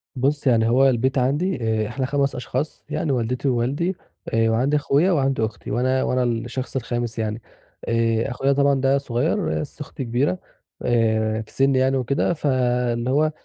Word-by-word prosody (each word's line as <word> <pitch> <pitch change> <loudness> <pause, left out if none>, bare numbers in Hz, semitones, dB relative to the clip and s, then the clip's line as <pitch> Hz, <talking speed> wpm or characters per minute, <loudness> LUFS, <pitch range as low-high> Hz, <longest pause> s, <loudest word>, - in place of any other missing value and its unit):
بُصّ، 140 +3 0
يعني 115 -2 +4
هو 135 +3 +5
البيت 130 +2 0
عندي 145 +9 +1 0.3
آآ، - - -4
إحنا 130 +3 -3
5 140 0 0
أشخاص 130 +4 -4
يعني 150 - -1
والدتي 125 +2 -1
ووالدي، 135 +9 0 0.4
وعندي 115 +6 +2
أخويا 150 +5 +2
وعندي 135 -7 +1
أختي، 110 - -7
وأنا 130 +3 +1
وأنا 125 0 +1
الشخص 120 +3 -3
الخامس 120 -2 -3
يعني 110 +1 -2 0.5
آآ، 115 -1 +1
أخويا 135 +3 +1
طبعًا 140 -1 +2
ده 135 +1 +3
صغير، 140 - -1
بس 150 0 -7
أختي 145 -1 -6
كبيرة 120 -5 0 0.4
آآ، 110 -2 +1
في 110 - -13
سنّي 135 -1 +2
يعني 130 +1 +2
وكده 130 +6 0
ف 155 - -7
اللي 125 -2 +1
هو 150 +3 +2
130 Hz, 165 wpm, -22 LUFS, 120-140 Hz, 0.5 s, هو